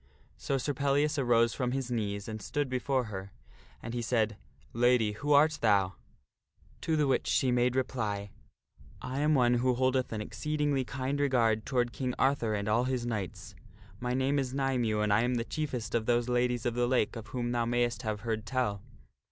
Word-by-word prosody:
So 140 - -2
Sir 145 +2 -2
Pellias 140 +2 +1
arose 115 -3 +3
from 125 -2 -1
his 130 -2 -3
knees 100 -3 -2
and 110 -1 -6
stood 130 +7 -2
before 130 +1 0
her, 100 -3 -7 0.5
and 115 - -5
he 120 - -2
said, 110 -2 +1 0.2
" 70 - -31
Lady, 120 -4 +3
who 145 +8 -3
art 150 +2 +4
thou?" 100 -4 +3 0.9
To 160 - 0
the 150 -1 +2
which 135 - +1
she 130 - +2
made 125 0 +2
reply, 105 -6 -2 0.3
" - - -54 0.3
I 130 +2 -3
am 150 +1 +3
one 125 -2 +4
who 130 0 +2
holdeth 130 0 +1
an 110 - -3
exceedingly 145 +5 -1
kind 135 +2 -3
regard 115 -6 +2
toward 120 -2 0
King 125 -2 -3
Arthur 130 -5 +1
and 100 0 -3
all 115 +4 +2
his 130 -2 -1
knights. 105 -7 -4 0.5
My 125 0 -1
name 135 +2 +1
is 130 -1 -3
Nymue 125 -6 0
and 105 -1 +2
I 105 - +4
am 125 +1 +1
the 115 -1 -1
chief 155 +1 -3
est 115 -4 -4
of 110 -2 0
those 120 0 +2
Ladies 125 -1 0
of 120 - +1
the 120 0 +1
Lake 125 -3 +1
of 115 -2 -7
whom 120 -1 -3
thou 120 -1 0
mayst 120 0 0
have 110 -3 -3
heard 110 -2 -2
tell. 105 -4 -1
120 Hz, 200 wpm, -30 LUFS, 110-130 Hz, 0.9 s, art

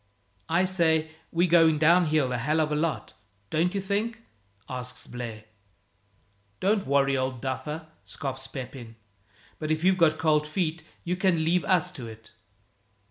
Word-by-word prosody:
"I 175 +3 +3
say, 160 -4 +2 0.2
we're 170 +2 +2
going 165 -2 +5
downhill 155 -4 +3
a - - 0
hell 150 +7 +1
of 155 -1 +1
a - - +1
lot, 155 +1 -2 0.4
don't 175 +5 +1
you - - +1
think?" 210 +4 -2 0.4
asks 125 0 -6
Blaire. 115 -3 -7 1.2
"Don't 200 -2 +1
worry, 140 0 +3
old 130 -1 -1
duffer," 150 +5 -4 0.2
scoffs 135 -1 -5
Pepin, 125 -4 -8 0.6
"but 155 - -3
if 155 +1 0
you've 185 0 +3
got 155 -2 +4
cold 150 -1 +2
feet 160 0 -2 0.2
you 175 +1 -1
can 180 -4 +2
leave 175 +2 +2
us 180 -1 +2
to 130 -10 -8
it." 110 0 -12
155 Hz, 150 wpm, -27 LUFS, 135-175 Hz, 1.2 s, going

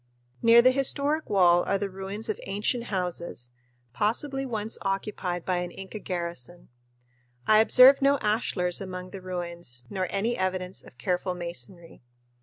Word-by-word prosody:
Near 235 +1 +7
the 255 - +6
historic 280 +3 +1
wall 175 -3 +5
are 195 - +1
the 200 0 -2
ruins 195 +3 -5
of 215 - -3
ancient 210 +5 -1
houses, 175 - -3 0.4
possibly 270 - -1
once 220 -2 -2
occupied 195 -3 -3
by 185 -1 0
an 175 0 -3
Inca 195 +4 -8
garrison. 175 -4 -5 0.8
I 215 0 +6
observed 255 +5 +7
no 280 +1 +4
ashlars 210 -6 0
among 185 -1 -7
the 195 - -8
ruins 170 -9 -4
nor 185 -2 -1
any 220 +5 -1
evidence 185 0 -3
of 125 - -17
careful 180 +6 -1
masonry. 170 0 -6
190 Hz, 145 wpm, -27 LUFS, 175-220 Hz, 0.8 s, Near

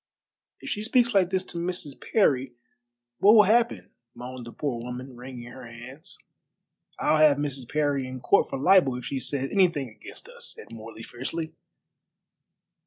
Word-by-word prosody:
"If - - -6
she 210 - -2
speaks 240 +2 +2
like 190 -3 +4
this 190 0 0
to 170 - -6
Mrs. 170 -4 -3 0.2
Parry, 135 - +3 0.7
what 210 +3 +7
will 210 - +9
happen?" 230 +4 +2 0.2
moaned 125 0 -8
the - - -8
poor 125 -4 -3
woman, 125 +2 -7
wringing 120 -1 -9
her 130 - -10
hands. 125 +6 -9 0.8
"I'll 155 - +2
have 155 -2 +6
Mrs. 140 -4 -4
Parry 145 -3 0
in 130 0 -6
court 200 - +3
for - - -3
libel 145 -3 +5
if 125 -1 -6
she 135 - -2
says 135 +1 -2
anything 170 -9 +2
against 110 -1 -11
us," - - -5
said - - -12
Morley 115 0 -9
fiercely. 155 +8 -5
140 Hz, 165 wpm, -26 LUFS, 125-180 Hz, 0.8 s, will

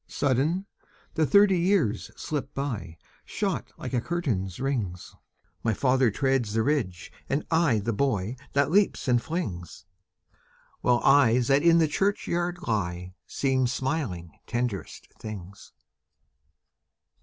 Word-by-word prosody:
Sudden, 145 +8 0 0.5
the 160 -1 +1
thirty 195 +4 +5
years 170 - +1
slip 145 -3 -4
by, 120 -12 -4 0.3
Shot - - -3
like - - -6
a 125 - +1
curtain's 115 - -2
rings! 115 -10 -3 0.5
My 110 -2 0
father 130 0 +3
treads 130 -2 0
the 110 0 +2
ridge, 110 - -1 0.2
and 140 +3 -1
I 160 -8 +3
The 110 +3 -1
boy 110 -3 0 0.2
that 140 +2 +2
leaps 200 -4 +2
and 120 -2 +3
flings, 95 - -5 0.9
While 120 -1 +2
eyes 125 -3 +4
that 140 +1 +4
in 170 0 +5
the 160 -1 +4
churchyard 175 0 -1
lie 90 -5 -2
Seem 130 -2 +1
smiling 120 - -3 0.2
tenderest 120 -5 -3
things. 100 -2 -9
130 Hz, 120 wpm, -27 LUFS, 105-155 Hz, 0.9 s, thirty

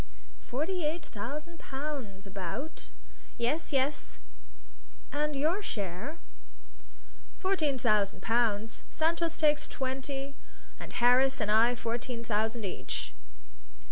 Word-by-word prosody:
"Forty 325 +8 -1
eight 315 +3 0
thousand 300 +10 -5
pounds, 265 -9 -4
about?" 195 - -4 0.5
"Yes 290 +9 +1
yes." 275 +1 +1 1.0
"And 300 0 +1
your 320 +9 +2
share?" 205 - -3 1.2
"Fourteen 330 -8 +2
thousand 210 -5 +2
pounds. 225 -2 +2
Santos 330 0 +1
takes 300 -1 +3
twenty, 270 +1 -2 0.5
and - - -7
Harris 255 +3 +5
and 210 -2 +1
I 230 +3 +6
fourteen 235 +1 -2
thousand 220 0 0
each." 190 - -3
265 Hz, 100 wpm, -31 LUFS, 225-300 Hz, 1.2 s, I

